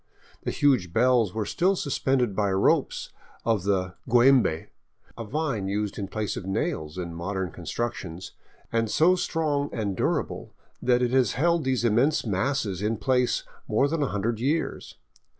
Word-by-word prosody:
The - - -3
huge 130 - +2
bells 120 -3 +3
were 110 -2 -1
still 185 - +1
suspended 130 - 0
by 100 -1 +1
ropes 95 - +1 0.3
of 115 -4 +2 0.5
giiembe, 120 -8 +4 0.5
a 115 - -6
vine 120 -4 -2
used 105 +1 -2
in 100 - -3
place 110 0 -3
of - - -5
nails 95 - -2
in 85 -2 -4
modern 95 +1 -3
constructions, 95 -7 -5 0.4
and 115 -1 0
so 170 +10 +4
strong 150 -5 -1
and 105 -4 -2
durable - - -2 0.3
that 125 0 +3
it 120 - +1
has 130 -5 +3
held 170 +3 +1
these 130 -2 +1
immense 125 +8 +2
masses 105 -2 -1
in 110 +2 0
place 125 +3 +1 0.2
more 120 +6 +2
than 160 +1 -1
a 140 - +2
hundred 110 +2 -1
years. 150 +7 -2
115 Hz, 150 wpm, -26 LUFS, 100-135 Hz, 0.5 s, giiembe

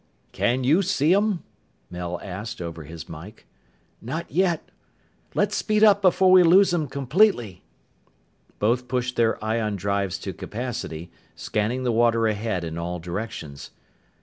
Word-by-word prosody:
"Can 125 +2 0
you 155 +9 +4
see 170 -4 +2
'em?" 205 -2 +1 0.5
Mel 90 0 -4
asked 100 +3 -6
over 85 -3 -6
his 80 +2 -9
mike. 85 +7 -11 0.6
"Not 160 +9 -5
yet. 175 -3 0 0.6
Let's - - +1
speed 215 0 +1
up 205 -2 +6
before 185 0 +4
we 185 0 +8
lose 180 +2 +5
'em 160 -4 0
completely!" 135 - +1 1.0
Both 120 +4 0
pushed 125 0 -2
their 115 -1 +2
ion 110 -1 -1
drives 100 -1 -1
to - - -5
capacity, 90 -9 -6 0.2
scanning 115 +5 -2
the 125 - +1
water 115 0 +3
ahead 110 -4 -1
in 80 0 -5
all 90 +1 -3
directions. 85 -5 -6
115 Hz, 140 wpm, -24 LUFS, -, 1.0 s, we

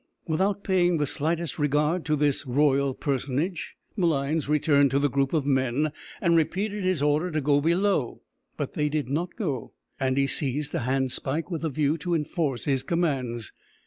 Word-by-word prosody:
Without 190 +5 0
paying 180 -3 +2
the 150 - +1
slightest 160 +3 -2
regard 150 +4 +1
to 155 - +2
this 145 -1 +1
royal 140 0 +2
personage, 145 +5 -2 0.2
Malines 155 -5 0
returned 145 -2 +4
to 135 - +1
the 140 -1 +1
group 135 +1 +1
of 155 -4 0
men, 135 +2 +1 0.3
and 170 -3 +3
repeated 200 +5 0
his 185 -6 +1
order 150 +4 +2
to 155 -2 -1
go 145 0 +2
below; 170 - +1 0.3
but - - -3
they 150 0 0
did 150 -3 -2
not 170 +5 -2
go, 145 - -3 0.3
and 130 0 0
he 140 - +4
seized 140 +1 -1
a - - 0
handspike 135 +5 -1
with 165 -2 -3
a 160 - 0
view 150 +2 0
to 175 +3 -1
enforce 150 -4 -1
his 135 -3 +1
commands. 130 -8 -1
150 Hz, 175 wpm, -26 LUFS, 135-170 Hz, 0.3 s, returned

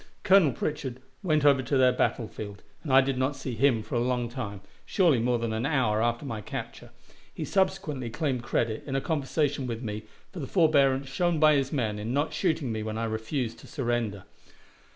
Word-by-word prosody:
Colonel 190 -7 +6
Pritchard 130 -1 -3 0.2
went 155 -5 +1
over 140 -2 +6
to 130 +2 0
their 130 -1 +5
battle 125 -2 0
field, 100 -3 -8 0.2
and 150 - -4
I 135 +1 +8
did 135 -1 -1
not 130 +2 0
see 130 -1 -5
him 115 -2 +2
for - - -10
a 120 - +2
long 120 -1 0
time, 105 -6 -6 0.2
surely 170 - +3
more 120 +1 +1
than 115 -1 -2
an 110 +1 -2
hour 120 -8 +1
after 120 +3 0
my 110 -5 -4
capture. - - -7 0.4
He - - -5
subsequently 185 -10 0
claimed 130 0 -1
credit, 115 -2 -1
in 135 - -2
a - - +3
conversation 145 -2 -1
with 115 0 -4
me, 105 -1 -4 0.3
for 190 - -8
the 135 - -4
forbearance 140 -6 +3
shown 170 +4 0
by 155 0 +6
his 135 -2 +1
men 110 -7 -1
in 110 +4 -3
not 145 +2 0
shooting 160 -8 0
me 110 -1 -3
when 110 0 -4
I 115 - -2
refused 115 +2 -3
to - - -13
surrender. 120 - -2
130 Hz, 205 wpm, -28 LUFS, 115-145 Hz, 0.4 s, I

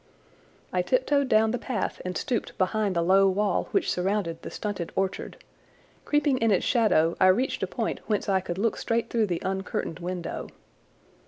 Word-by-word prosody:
I - - +2
tiptoed 290 - +1
down 220 0 +4
the 245 - -2
path 250 -4 -3
and 180 0 -3
stooped 240 -3 -3
behind 200 +1 0
the 170 - +2
low 195 +2 +5
wall 200 0 +1
which - - +1
surrounded 180 -2 -1
the - - -7
stunted 200 -5 -4
orchard. 190 0 -2 0.7
Creeping 290 -3 +2
in 225 - +2
its 195 - +2
shadow 205 -9 +3
I 185 - +6
reached 235 +9 +2
a - - 0
point - - -3
whence 210 -2 0
I 195 -1 +3
could 175 -1 -5
look 225 +3 0
straight 230 0 -1
through 225 -3 +2
the 175 -3 -3
uncurtained 190 -3 -3
window. 175 -1 -4
200 Hz, 175 wpm, -26 LUFS, 185-230 Hz, 0.7 s, I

